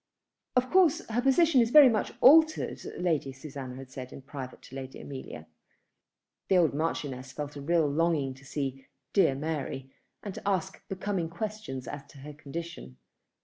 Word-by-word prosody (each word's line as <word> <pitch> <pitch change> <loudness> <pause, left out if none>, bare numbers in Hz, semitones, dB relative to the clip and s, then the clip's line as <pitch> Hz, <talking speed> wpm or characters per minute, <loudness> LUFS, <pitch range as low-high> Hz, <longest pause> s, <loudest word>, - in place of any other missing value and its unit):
"Of 255 0 +2
course 365 -5 +4
her 230 +2 +1
position 270 +1 +5
is 230 - +2
very 295 +1 +9
much 225 -4 +1
altered," 315 +3 +6 0.2
Lady 160 -6 0
Susanna 135 -1 -8
had 130 0 -10
said 130 -1 -7
in 135 - -10
private 135 -2 -8
to 130 - -12
Lady 135 -1 -7
Amelia. 130 - -8 1.0
The 190 - +4
old 165 -5 +4
Marchioness 140 -4 -3
felt 145 0 -6
a 140 - -6
real 165 +1 +2
longing 150 -2 +1
to 135 +1 -17
see 135 -1 -4 0.3
"dear 195 -9 +4
Mary," 140 -3 -4 0.3
and 200 - -5
to - - -8
ask 190 -1 -1
becoming 190 -3 -2
questions 170 - -5
as 145 -1 -6
to 145 - -16
her 145 +2 -9
condition. 150 - -8
150 Hz, 165 wpm, -29 LUFS, 135-200 Hz, 1.0 s, very